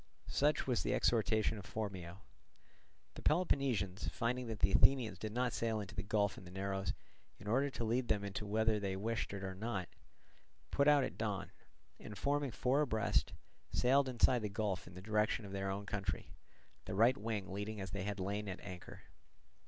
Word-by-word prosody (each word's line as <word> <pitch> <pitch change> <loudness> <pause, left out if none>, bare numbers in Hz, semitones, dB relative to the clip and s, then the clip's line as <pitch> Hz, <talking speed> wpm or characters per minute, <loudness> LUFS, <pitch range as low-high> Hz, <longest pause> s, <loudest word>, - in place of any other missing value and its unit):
Such 150 +2 +2
was 125 -3 +1
the - - +1
exhortation 110 -2 +2
of 95 - -10
Phormio. 95 -4 -5 0.9
The - - -9
Peloponnesians 135 - +1
finding 125 +1 -1
that 110 -2 -5
the 85 +4 +4
Athenians 125 +1 +4
did 110 - -4
not 125 +1 0
sail 110 -1 0
into 100 -1 -6
the 100 - -2
gulf 100 0 0
and 90 - -12
the - - -9
narrows, 95 +1 -2 0.4
in 100 - -11
order 135 +6 +2
to 120 - -4
lead 120 +2 +1
them 105 -2 +1
in 100 -1 -4
whether 110 +1 +2
they 100 -2 -2
wished 115 +4 -2
it 100 -1 -5
or 95 0 -3
not, 100 -2 -3 0.8
put 140 +1 +3
out 145 -2 +6
at - - -4
dawn, 105 -4 -2 0.5
and 105 - -8
forming 145 0 +1
four 130 +5 +2
abreast, 110 -7 +1 0.4
sailed 135 +2 +4
inside 125 0 +4
the 105 - -2
gulf 100 -2 -2
in 85 - -11
the 90 - -8
direction 105 +1 +1
of 100 - -8
their 95 0 -2
own 100 +1 -3
country, 100 -2 -3 0.5
the - - -4
right 115 +5 +5
wing 105 -3 -3
leading 105 +2 -4
as 95 -2 -5
they 100 - -3
had 100 +1 -3
lain 100 +2 -2
at 95 - -5
anchor. 90 -3 -9
105 Hz, 190 wpm, -36 LUFS, 100-120 Hz, 0.9 s, out